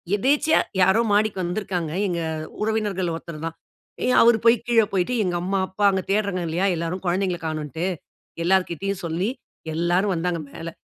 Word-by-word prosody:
எதேர்ச்சையா 290 +8 +3 0.2
யாரோ 190 +5 +5
மாடிக்கு 205 -2 +2
வந்திருக்கிறாங்க. 175 -3 -2 0.2
எங்க 175 -2 -1 0.4
உறவினர்கள்ல 210 -5 0
ஒருத்தர் 165 -2 -8
தான். 165 - -7 0.5
ஏ - - +1 0.2
அவரு 235 -1 +6
போய் 230 +1 +7
கீழே 230 -2 +4
போய்ட்டு 190 +4 0
எங்க 180 -2 -1
அம்மா, 190 +2 -1
அப்பா 195 +2 -4
அங்க 190 -1 0
தேடுறாங்க 200 -3 0
இல்லையா? 170 +4 0
எல்லோரும் 170 +3 -3
கொழந்தைங்கள 180 0 0
கானோண்ட்டு, 155 +1 -3 0.6
எல்லார்கிட்டயும் 190 +1 0
சொல்லி, 170 +5 -1 0.4
எல்லாரும் 175 +4 +1
வந்தாங்க 170 0 -1
மேலே. 165 +3 -7
185 Hz, 150 wpm, -23 LUFS, 170-205 Hz, 0.6 s, போய்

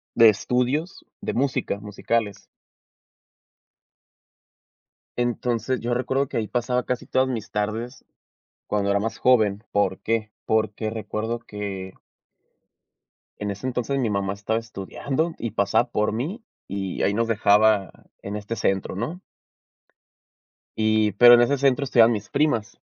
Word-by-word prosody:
de 115 -1 +8
estudios, 125 - -1
de - - -3
música 130 -6 -1
musicales. 105 +1 -2 2.7
Entonces 120 0 -1
yo 120 +1 -2
recuerdo 130 +3 0
que - - -4
ahí 110 -2 -1
pasaba 125 +1 0
casi 125 -1 -3
todas 130 0 +2
mis 115 -5 -4
tardes 110 +5 -3 0.6
cuando 100 -1 0
era 100 0 +2
más 110 +2 -3
joven. 110 -5 +3
¿Por 95 -2 +1
qué? 110 -1 -1
Porque 110 0 0
recuerdo 110 +1 -3
que 100 -4 -6 1.4
en 105 -1 -3
ese 100 +6 -5
entonces 130 +2 -1
mi 120 -4 0
mamá 100 -1 -1
estaba 105 +3 -1
estudiando 130 - -3
y 115 - -4
pasaba 110 +4 +1
por 105 -2 0
mí 155 - -4 0.2
y 95 -1 -4
ahí 100 - +2
nos 115 +2 0
dejaba 105 -2 +3 0.3
en 100 +1 -5
este 105 +2 -5
centro, 95 -4 -1
¿no? 150 - -4 1.6
Y 110 -1 +2
pero 120 +4 +9
en 120 - +5
ese 140 +4 +2
centro 140 +1 +2
estudiaban 120 -3 +5
mis 105 -2 -5
primas. 115 -9 0
110 Hz, 135 wpm, -24 LUFS, 105-125 Hz, 2.7 s, pero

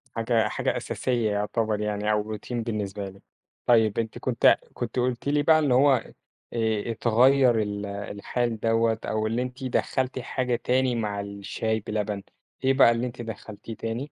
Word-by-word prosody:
حاجة 115 0 +2
حاجة - - -1
أساسية 120 -4 -1
يُعتبر 105 +1 -1
يعني 105 0 -1
أو 105 0 -1
Routine 125 - -9
بالنسبة 105 -4 -3
لي، 95 +1 -16 0.4
طيب 110 -3 +4
أنتِ 115 -1 -3
كنتِ - - +4 0.2
كنتِ 120 +1 -3
قُلتِ 125 +2 -1
لي 145 0 +2
بقى 155 +1 +6
إن 145 -4 +1
هو 140 +3 +5 0.6
آآ، 110 -1 0
اتغيّر 120 +2 +4
ال 105 -1 -3
الحال 105 +3 -3
دوّة 115 0 +2
أو 110 0 -1
اللي 115 +3 0
أنتِ 125 +1 -5
دخّلتِ 130 +1 -1
حاجة 125 0 -1
تاني 130 -1 +2
مع 105 -3 -2
الشاي 100 +2 -3
بلبن، 105 -1 -3 0.4
إيه 135 - +4
بقى 135 -3 +6
اللي 120 +2 -1
أنتِ 120 0 -8
دخّلتيه 110 0 -8
تاني؟ 115 +6 -4
115 Hz, 160 wpm, -26 LUFS, 105-125 Hz, 0.6 s, بقى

